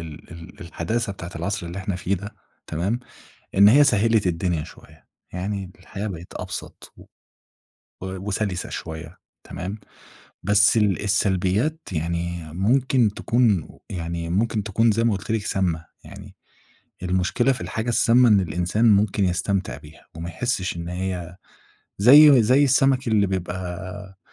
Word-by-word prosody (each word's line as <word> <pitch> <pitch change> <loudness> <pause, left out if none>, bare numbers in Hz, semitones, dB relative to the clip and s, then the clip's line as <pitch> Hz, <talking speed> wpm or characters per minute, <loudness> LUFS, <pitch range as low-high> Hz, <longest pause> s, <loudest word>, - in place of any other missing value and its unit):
ال 80 -1 -10
ال 85 0 -12
الحداثة 100 +6 -3
بتاعة 90 -2 -8
العصر 90 +2 -3
اللي 85 +3 -6
إحنا 95 -1 -3
فيه 95 +2 -1
ده، 100 +3 -8 0.3
تمام، 95 +9 -2 0.6
إن 100 +1 +7
هي 145 +7 +7
سهَّلِت 110 -4 +2
الدنيا 85 -2 -1
شوية - - -16 0.3
يعني، 95 0 -4
الحياة 100 +3 -6
بقت 90 -3 -8
أبسَط - - -8
و - - -15 1.0
وسَلِسة 95 0 -3
شوية، 80 -1 -7 0.3
تمام. 95 +4 -6 0.6
بس 105 +4 +4
ال 105 -3 +2
السلبيات 100 - +1
يعني 85 0 -3
ممكن 120 +4 +2
تكون 115 -9 +1 0.2
يعني 85 -2 -4
ممكن 105 +3 0
تكون 110 +3 +2
زي 115 +2 +1
ما 115 - +3
قُلت 95 - -9
لك 110 -2 -1
سامَّة. 85 -5 -1 0.2
يعني - - -12 0.7
المشكلة 95 +8 +1
في 125 - -6
الحاجة 110 +2 -4
السامَّة 120 +1 +4
إن 105 -3 +5
الإنسان 90 +6 +1
ممكن 100 0 +2
يستمتِع 95 +3 -1
بيها 75 +2 -16
وما 85 +1 -6
يحِسِّش 90 -1 -2
إن 85 0 -6
هي 90 -1 -4 0.6
زي 140 +3 +8
زي 130 +6 +4
السمك 135 -2 +2
اللي 105 -2 +3
بيبقى 95 +1 -5
95 Hz, 140 wpm, -23 LUFS, 90-110 Hz, 1.0 s, زي